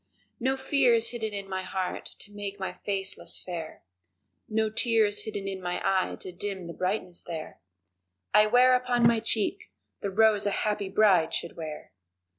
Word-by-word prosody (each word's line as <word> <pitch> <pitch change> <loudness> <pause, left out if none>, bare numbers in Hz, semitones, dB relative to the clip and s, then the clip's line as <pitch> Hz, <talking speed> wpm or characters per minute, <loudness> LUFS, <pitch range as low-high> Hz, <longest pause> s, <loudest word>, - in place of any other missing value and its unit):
No 265 +2 +1
fear 265 -2 +3
is 230 0 +2
hidden 220 -3 -3
in 200 -1 -5
my 190 -1 -3
heart 185 0 -3
to 205 - -11
make 205 -1 -6
my 190 -1 -3
face 195 0 -3
less - - -4
fair, 170 -3 -7 0.7
No 220 0 +1
tear 230 0 +3
is 205 0 -1
hidden 205 -2 -4
in 190 -1 -4
my 180 0 -2
eye 190 -1 +1
to 185 - -6
dim 190 0 -5
the 170 - -7
brightness 185 -1 -2
there 160 -2 -7 0.7
I 210 0 +7
wear 250 +3 +6
upon 250 -1 +2
my 230 -1 +5
cheek 220 -1 -1 0.3
the 200 - -2
rose 210 0 +4
a 205 - 0
happy 210 -2 -1
bride 190 -5 +4
should - - -4
wear. 155 -2 -7
205 Hz, 180 wpm, -28 LUFS, 185-220 Hz, 0.7 s, I